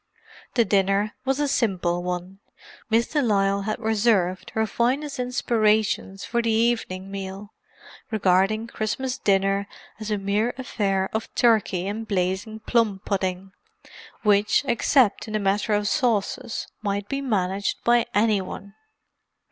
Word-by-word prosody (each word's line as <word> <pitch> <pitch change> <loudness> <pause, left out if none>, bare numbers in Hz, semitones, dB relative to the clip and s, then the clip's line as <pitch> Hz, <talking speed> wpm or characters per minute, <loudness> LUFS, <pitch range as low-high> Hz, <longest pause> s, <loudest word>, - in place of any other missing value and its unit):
The 235 - +4
dinner 200 +2 +2
was 270 +1 0
a 295 - +1
simple 185 -10 0
one—Miss 190 +5 -4
de 300 - +1
Lisle 200 -4 +2
had 215 - -1
reserved 205 -5 +1
her 220 0 +2
finest 265 +6 -1
inspirations 220 -5 +1
for 235 0 0
the 230 - -1
evening 220 -4 0
meal, 195 +1 -7 0.6
regarding 205 +1 +2
Christmas 250 +4 -3
dinner 195 -1 +1 0.3
as 215 0 -5
a 210 - 0
mere 205 +4 0
affair 195 -7 -1
of 220 +1 -2
turkey 215 -6 +2
and 220 +3 -4
blazing 190 +3 -2
plum 220 -4 +1
pudding, 190 -1 -2 0.7
which, 210 +4 +3
except 240 -2 +2
in 215 - -6
the 215 - +1
matter 205 +2 +1
of 205 0 +1
sauces, 235 +1 0 0.2
might 200 -1 -2
be 275 +4 -2
managed 200 -6 -1
by 240 0 +3
any 210 -1 +3
one. 195 +2 -8
210 Hz, 130 wpm, -24 LUFS, 195-230 Hz, 0.7 s, The